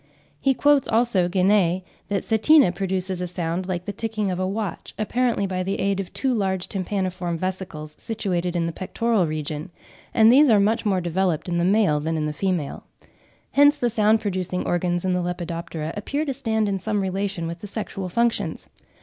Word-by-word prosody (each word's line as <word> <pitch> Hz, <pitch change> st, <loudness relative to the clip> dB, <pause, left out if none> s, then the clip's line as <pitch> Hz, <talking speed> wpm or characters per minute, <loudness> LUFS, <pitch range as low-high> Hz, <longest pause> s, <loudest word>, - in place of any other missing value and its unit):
He 270 Hz, -1 st, +2 dB
quotes, 290 Hz, 0 st, +3 dB
also, 220 Hz, -6 st, +2 dB
Guenee, 185 Hz, -1 st, +2 dB, 0.2 s
that 200 Hz, -2 st, -1 dB
Setina 235 Hz, -, +5 dB
produces 190 Hz, 0 st, -2 dB
a 180 Hz, -, -2 dB
sound 175 Hz, +1 st, -3 dB
like 180 Hz, -2 st, -3 dB
the 205 Hz, -, -4 dB
ticking 215 Hz, -2 st, -2 dB
of 180 Hz, -, -3 dB
a 185 Hz, -, 0 dB
watch, 200 Hz, -1 st, -4 dB
apparently 235 Hz, 0 st, 0 dB
by 185 Hz, -1 st, -2 dB
the 195 Hz, +2 st, -2 dB
aid 195 Hz, 0 st, 0 dB
of 195 Hz, -, -4 dB
"two 265 Hz, -2 st, 0 dB
large 190 Hz, -4 st, -1 dB
tympaniform 185 Hz, -3 st, -2 dB
vesicles, 180 Hz, -4 st, -5 dB
situated 180 Hz, -5 st, -2 dB
in 170 Hz, -, +1 dB
the 165 Hz, -, -2 dB
pectoral 195 Hz, +2 st, 0 dB
region"; 155 Hz, 0 st, -4 dB, 0.4 s
and 225 Hz, 0 st, +6 dB
these 280 Hz, +3 st, +6 dB
"are 215 Hz, -3 st, +6 dB
much 215 Hz, +2 st, +1 dB
more 190 Hz, -3 st, +2 dB
developed 175 Hz, -1 st, 0 dB
in 170 Hz, -1 st, 0 dB
the -, -, +1 dB
male 190 Hz, -5 st, +3 dB
than 160 Hz, +2 st, -2 dB
in 155 Hz, -, -1 dB
the 150 Hz, -, -2 dB
female." 175 Hz, -4 st, -2 dB, 0.7 s
Hence 290 Hz, +1 st, +5 dB
the 240 Hz, -1 st, 0 dB
sound 215 Hz, 0 st, +3 dB
producing 185 Hz, -2 st, -2 dB
organs 175 Hz, 0 st, 0 dB
in 185 Hz, -, +1 dB
the 180 Hz, -, +1 dB
Lepidoptera 170 Hz, -2 st, -4 dB
appear 280 Hz, +9 st, -2 dB
to 275 Hz, -, -1 dB
stand 220 Hz, -5 st, 0 dB
in 195 Hz, -1 st, -1 dB
some 210 Hz, +1 st, -1 dB
relation 190 Hz, -2 st, -2 dB
with 170 Hz, +1 st, -5 dB
the 205 Hz, -, -8 dB
sexual 195 Hz, -3 st, -5 dB
functions. 205 Hz, -4 st, 0 dB
190 Hz, 190 wpm, -23 LUFS, 175-215 Hz, 0.7 s, and